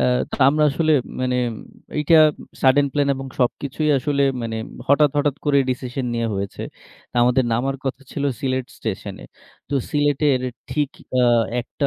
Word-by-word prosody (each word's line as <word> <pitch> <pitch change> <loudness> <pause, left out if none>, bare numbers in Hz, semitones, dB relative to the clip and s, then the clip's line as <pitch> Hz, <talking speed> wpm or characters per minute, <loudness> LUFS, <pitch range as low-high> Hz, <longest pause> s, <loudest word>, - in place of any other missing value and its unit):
আ - - +2 0.3
তো - - -4
আমরা 150 +1 +3
আসলে 155 +2 +1 0.3
মানে 125 0 0 0.6
এইটা 155 +2 +4 0.5
সাডেন 140 +2 +5
প্ল্যান 145 -1 +1
এবং 135 0 -6
সবকিছুই 140 +4 0
আসলে 140 +1 0 0.2
মানে 115 -1 -3 0.3
হঠাৎ, 145 0 +5
হঠাৎ 145 -1 +1
করে 145 -2 +3
ডিসিশন 125 +1 -3
নেয়া 115 -1 -1
হয়েছে। 100 0 -4 0.6
আমাদের 125 +2 +3
নামার 135 +4 0
কথা 135 +1 -3
ছিল 145 - -3 0.2
সিলেট 130 -2 -1
স্টেশনে। 100 -2 -5 0.5
তো 140 - -2 0.2
সিলেটের 145 -2 +2 0.3
ঠিক 145 -2 0 0.3
আ - - +4 0.4
একটা 140 +4 -3
135 Hz, 145 wpm, -21 LUFS, 125-145 Hz, 0.6 s, সাডেন